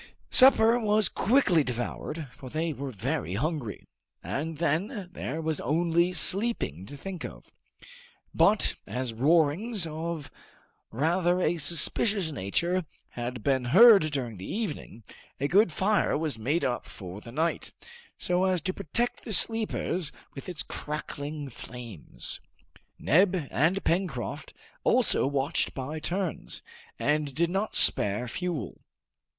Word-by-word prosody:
Supper 245 -3 +6
was 215 -2 +3
quickly 200 - +3
devoured, 130 +5 -4
for 130 - -10
they 160 +3 -1
were 140 +1 -5
very 95 -5 -3
hungry, 140 -2 -3 0.4
and 155 +3 -3
then 175 +4 -1
there 155 -1 -4
was 160 -1 -1
only 170 +5 +2
sleeping 180 - 0
to 145 - -9
think 185 +3 -6
of. - - -9 0.8
But, 210 +1 +3
as 125 -2 -3
roarings 165 - +2
of 160 -1 -5 0.6
rather 175 +8 +1
a 175 -1 +1
suspicious 170 +4 +2
nature 170 - 0 0.3
had 120 -1 -5
been 130 -3 +1
heard 200 - +8
during 125 -7 -3
the 95 - -7
evening, 175 - -4 0.4
a 140 - +1
good 195 +3 +4
fire 200 +3 +2
was 150 -6 -2
made 145 +10 0
up 125 - -2
for 95 +1 -9
the 115 - -11
night, 160 +6 -1 0.5
so 180 +1 +1
as 185 -1 +2
to 185 +4 -2
protect 235 +8 -2
the 220 - -5
sleepers 210 -6 +1 0.2
with 135 - -8
its 175 -4 -3
crackling 150 0 -5
flames. 115 -7 -7 0.6
Neb 185 +4 +4 0.2
and 170 +8 +2
Pencroft 165 - -2 0.3
also - - +3
watched 140 +3 0
by 145 +4 -4
turns, 180 +1 -3 0.3
and 150 -2 0
did 170 +2 +1
not 195 +3 -1
spare 105 +5 +2
fuel. 155 - -4
160 Hz, 130 wpm, -28 LUFS, 135-185 Hz, 0.8 s, heard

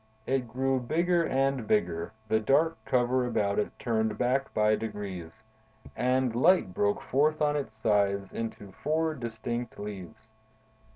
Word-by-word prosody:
It 130 -1 0
grew 130 +3 0
bigger 170 +7 +1
and 135 -3 0
bigger, 85 -5 0 0.2
the 110 0 +2
dark 150 +9 +3
cover 125 0 +2
about 105 -4 0
it 105 - 0
turned 110 -2 0
back 130 +2 0
by 105 0 +3
degrees, 105 -3 -6 0.5
and 125 -1 +1
light 130 - +4
broke 100 +2 0
forth 150 +4 +2
on 150 -1 +2
its 135 -7 -3
sides 100 -3 +1
into 110 -3 -5
four 155 +7 -1
distinct 120 -2 -5
leaves. 105 +1 -8
120 Hz, 135 wpm, -29 LUFS, 105-135 Hz, 0.5 s, light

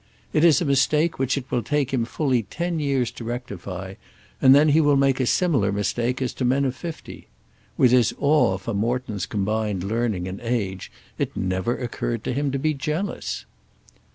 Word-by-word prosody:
It 155 - +3
is 165 -3 +6
a 175 - -1
mistake 150 +4 +2
which 135 +1 +1
it 130 -2 -6
will 120 - +1
take 140 0 -1
him 120 -3 +1
fully 130 -1 0
ten 170 - -3
years 135 -5 0
to - - -9
rectify, 100 -6 -6 0.5
and 130 0 +8
then 150 +2 +5
he 155 +2 +5
will 145 -2 +4
make 135 -1 +2
a 130 - +1
similar 140 - +2
mistake 120 +6 -1
as 125 - -2
to - - -4
men 135 +3 +2
of 130 -1 -1
fifty. 165 +5 -8 0.5
With 125 - +5
his 125 -2 +4
awe 140 -10 +3
for 110 +4 -5
Morton's 110 -1 -2
combined 105 -3 -1
learning 105 -3 -1
and 95 +1 -6
age, 105 -6 -3 0.3
it - - -2
never 95 +5 -1
occurred 120 -2 -3
to - - -2
him 140 +2 0
to 135 - -1
be 155 +3 0
jealous. 150 +8 -3
125 Hz, 185 wpm, -23 LUFS, 105-140 Hz, 0.5 s, and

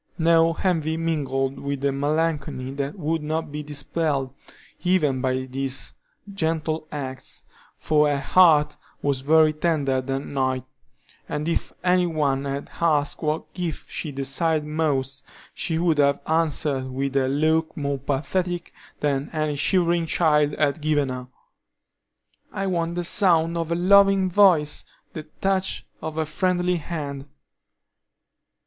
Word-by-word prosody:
No 165 0 +4
envy 160 -4 +1
mingled 140 -5 -1
with 140 -1 -4
the 140 0 +1
melancholy 145 -2 -1
that 140 +4 -4
would 160 -1 -1
not 155 0 -3
be 150 +1 -4
dispelled 145 -1 -2 0.5
even 155 -8 +2
by 130 0 0
these 135 0 -3 0.4
gentle 160 -3 -1
acts, 135 -3 -5 0.3
for 150 -1 +2
her 145 -1 0
heart 150 -1 +4 0.3
was 140 -2 0
very 155 +2 +4
tender 150 -5 0
that 135 +1 -2
night, 130 -3 -1 0.7
and 150 +1 -3
if 170 - -1
any 180 0 +3
one 140 -4 0
had 140 0 -4
asked 150 -4 +1
what 155 0 -2
gifts 175 -4 -5
she 155 - -3
desired 145 +3 0
most, 140 -3 -1 0.3
she 165 -2 -2
would 165 -3 +1
have 140 0 +3
answered 150 -4 0
with 135 +1 -3
a 135 -1 +2
look 155 +4 +1
more 140 -2 -2
pathetic 175 +6 -2 0.3
than 145 -1 0
any 155 -2 -1
shivering 170 +2 +1
child 150 -2 +2
had 150 +1 +1
given 150 -3 +1
her: 125 -1 -5 1.2
"I 195 - -3
want 170 -2 -1
the 175 - -1
sound 170 -3 +3
of 165 -1 -2
a - - +2
loving 195 +1 +5
voice; 175 -7 +4 0.3
the 155 -1 -7
touch 190 -1 0 0.2
of 160 0 -5
a 160 - 0
friendly 180 +3 0
hand." 145 -4 -5
155 Hz, 135 wpm, -24 LUFS, 140-165 Hz, 1.2 s, loving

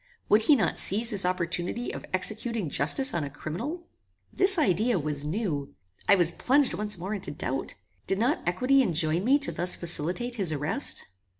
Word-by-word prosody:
Would 210 +2 +4
he 290 +7 +4
not 235 - -1
seize 225 +5 +6
this 195 -3 +2
opportunity 180 +5 -3
of - - -8
executing 210 - -2
justice 265 - +4
on 165 - -2
a 140 - -5
criminal? 230 - -7 0.5
This 385 0 +3
idea 220 - +1
was 150 -2 -3
new. 155 -6 -4 0.3
I 200 - +7
was 175 -3 +3
plunged 275 +8 +1
once 210 -1 -2
more 190 +5 -5
into 200 -3 -6
doubt. - - -5 0.3
Did 195 - +1
not 245 +8 0
equity 255 +10 +2
enjoin 170 -4 0
me 265 +6 +3
thus 180 -10 0
to - - -5
facilitate 180 +9 -1
his 190 -6 +1
arrest? 155 - -1
195 Hz, 175 wpm, -26 LUFS, 170-245 Hz, 0.5 s, I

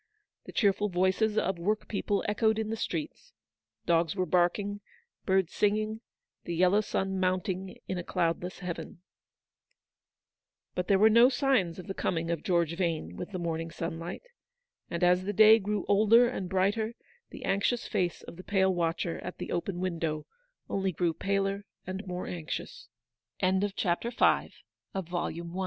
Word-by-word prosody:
The - - -9
cheerful 205 -1 +2
voices 190 +4 +1
of 190 -2 0
workpeople 205 +1 -1
echoed 220 +1 +2
in 220 0 -2
the - - -1
streets 165 -7 -4
j - - -28 0.5
dogs 165 0 +2
were 185 -2 0
barking, 185 +4 +1 0.5
birds 190 -3 +2
singing, 215 +1 0 0.4
the 170 - -4
yellow 185 +4 +4
sun 190 -2 -2
mounting 185 0 -1
in 185 - -2
a - - -4
cloudless 170 +2 -1
heaven. 175 -1 -6 1.7
But 180 0 -2
there 195 - +5
were 215 +3 +6
no 235 +3 +7
signs 250 - +1
of 185 - -8
the 195 - -4
coming 165 -3 -1
of 165 -3 -2
George 170 -3 +1
Vane 165 - -2
with - - -6
the 195 - -5
morning 165 -1 -3
sunlight; 165 - -5 0.7
and 170 +1 -2
as 180 +1 +4
the 205 - -1
day 220 +2 +8
grew 210 -1 -2
older 220 +4 +6
and 195 -7 -4
brighter, 205 +5 +1 0.3
the - - -8
anxious 210 +5 +1
face 180 -5 -1
of - - -10
the 185 - -9
pale 190 -1 +2
watcher 170 -1 -1
at 180 - -7
the - - -6
open 175 +1 -2
190 Hz, 130 wpm, -29 LUFS, 175-210 Hz, 1.7 s, day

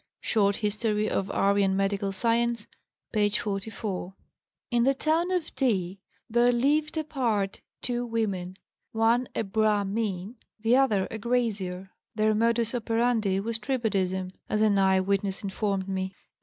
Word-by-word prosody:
Short 200 -3 +2
History 210 0 0
of 195 - -1
Aryan 200 -1 +2
Medical 195 0 0
Science, 230 +2 0 0.5
p. 210 -2 +3
44.) 200 -2 -3 0.6
"In 240 -1 +3
the 270 +2 +3
town 320 +5 +1
of 360 -4 -1
D. 195 -8 0 0.3
there 240 +2 +4
'lived 295 +6 +1
apart' 235 -10 -1 0.2
two 245 -1 -1
women, 200 -6 -2 0.4
one 230 +2 +2
a - - 0
Brahmin, 210 0 0 0.2
the 225 +3 +3
other 220 -8 +3
a 225 - -5
grazier; 205 -6 -1 0.2
their 215 0 +3
modus 230 +1 +1
operandi 225 -4 +1
was 225 +2 -2
tribadism, 195 -7 -1 0.2
as 215 - +1
an 205 -2 +4
eyewitness 190 +1 +1
informed 195 -1 -1
me. 190 0 -3
215 Hz, 130 wpm, -27 LUFS, 195-235 Hz, 0.6 s, there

